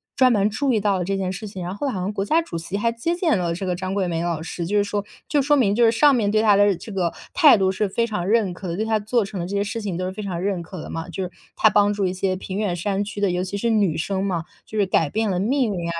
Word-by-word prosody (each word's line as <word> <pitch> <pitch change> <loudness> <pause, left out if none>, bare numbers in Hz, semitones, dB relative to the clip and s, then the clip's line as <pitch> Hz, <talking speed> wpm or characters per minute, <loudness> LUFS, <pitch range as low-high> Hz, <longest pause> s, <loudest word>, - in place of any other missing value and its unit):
专 255 -1 +5
门 210 -2 +3
注 265 +6 0
意 220 - +2
到 200 -2 +1
了 180 - -1
这 195 +1 -1
件 190 -1 -2
事 210 +3 -6
情， 190 -3 -7
然 180 +2 -4
后 280 +7 -3
好 200 -8 -2
像 190 +3 -2
国 195 -1 -1
家 320 +10 +3
主 325 - -6
席 170 +4 -4
还 230 +3 +1
接 235 +10 -2
见 340 - +2
了 170 -2 -1
这 180 +3 -4
个 180 -1 -1
张 185 +1 -4
桂 195 -2 0
梅 165 -1 -2
老 170 -2 -2
师。 170 +1 -5
就 205 +5 0
是 205 - +4
说 205 0 -2 0.2
就 290 - +2
说 295 +2 +3
明 220 -8 +3
就 240 - +3
是 225 - +5
上 285 +5 +5
面 215 -4 +1
对 215 +1 +2
她 210 -2 +5
的 205 -1 +4
这 220 - -10
个 180 -4 -1 0.2
态 310 -9 +7
度， 190 -1 +2
是 200 +2 -1
非 230 +4 0
常 210 -6 -3
认 210 -3 +2
可 185 +1 -8
的， 170 - -3
对 215 +4 -1
她 220 -1 +1
做 215 +2 +1
成 195 -1 -6
的 170 - -2
这 200 - -4
些 200 - +1
事 225 +3 -4
情 195 -5 -3
都 185 - -2
是 185 - -3
非 210 - -7
常 180 -4 -3
认 190 -2 -1
可 180 0 -8
的 - - -8
嘛。 165 +1 -5
就 185 +3 -4
是， 180 - -5 0.2
她 215 - +5
帮 205 0 +3
助 200 -1 -1
一 180 - -1
些 185 0 -1
偏远 190 0 -3
山 195 +3 -1
区 205 0 -7
的， 200 -2 +2
尤 180 +1 -1
其 190 +2 -4
是 235 +3 0
女 205 -8 +2
生 190 +3 -1
嘛， 175 -4 -1 0.2
就 215 - -7
是 205 - +3
改 165 -5 +1
变 220 0 0
了 180 - 0
命 235 +1 +1
运 170 -2 -3
啊， - - -2
200 Hz, 355 characters per minute, -22 LUFS, 185-215 Hz, 0.2 s, 态